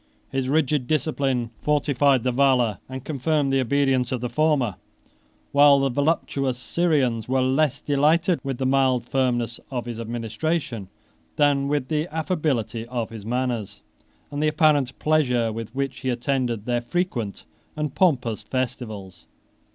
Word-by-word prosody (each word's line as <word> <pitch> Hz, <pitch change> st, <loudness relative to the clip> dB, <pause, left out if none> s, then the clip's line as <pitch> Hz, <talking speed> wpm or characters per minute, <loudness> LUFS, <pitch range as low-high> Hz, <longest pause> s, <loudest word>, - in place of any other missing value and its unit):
His 135 Hz, -1 st, -1 dB
rigid 145 Hz, -3 st, +1 dB
discipline 135 Hz, -6 st, 0 dB
fortified 140 Hz, -3 st, +2 dB
the 125 Hz, -, +1 dB
valor 125 Hz, -6 st, +2 dB
and 130 Hz, 0 st, -7 dB
confirmed 145 Hz, -1 st, 0 dB
the 135 Hz, -, +3 dB
obedience 130 Hz, -1 st, +1 dB
of 130 Hz, -, -1 dB
the 125 Hz, 0 st, -4 dB
former, 145 Hz, -, +1 dB, 0.8 s
whilst 140 Hz, -1 st, +6 dB
the 135 Hz, -, +1 dB
voluptuous 140 Hz, -4 st, 0 dB
Syrians 130 Hz, -7 st, 0 dB
were 130 Hz, 0 st, +2 dB
less 135 Hz, +1 st, +1 dB
delighted 160 Hz, +5 st, +2 dB
with 135 Hz, -2 st, -3 dB
the 130 Hz, -, -2 dB
mild 130 Hz, -2 st, +2 dB
firmness 120 Hz, -3 st, 0 dB
of 125 Hz, -3 st, -3 dB
his 120 Hz, -2 st, -6 dB
administration, 115 Hz, -, -3 dB, 0.5 s
than 140 Hz, -1 st, +2 dB
with 145 Hz, -2 st, -1 dB
the 155 Hz, +1 st, 0 dB
affability 150 Hz, -, -1 dB
of 120 Hz, -2 st, -3 dB
his 110 Hz, -2 st, -8 dB
manners, 120 Hz, -4 st, -2 dB, 0.5 s
and 145 Hz, 0 st, -3 dB
the 155 Hz, -, +2 dB
apparent 150 Hz, -4 st, +2 dB
pleasure 125 Hz, -7 st, +2 dB
with 115 Hz, 0 st, -5 dB
which 135 Hz, -1 st, -2 dB
he 130 Hz, -, -2 dB
attended 120 Hz, -3 st, -1 dB
their 120 Hz, -1 st, 0 dB
frequent 120 Hz, -, -3 dB, 0.3 s
and 150 Hz, -2 st, -3 dB
pompous 125 Hz, -, +1 dB
festivals. 110 Hz, -6 st, -5 dB
130 Hz, 145 wpm, -24 LUFS, 120-145 Hz, 0.8 s, whilst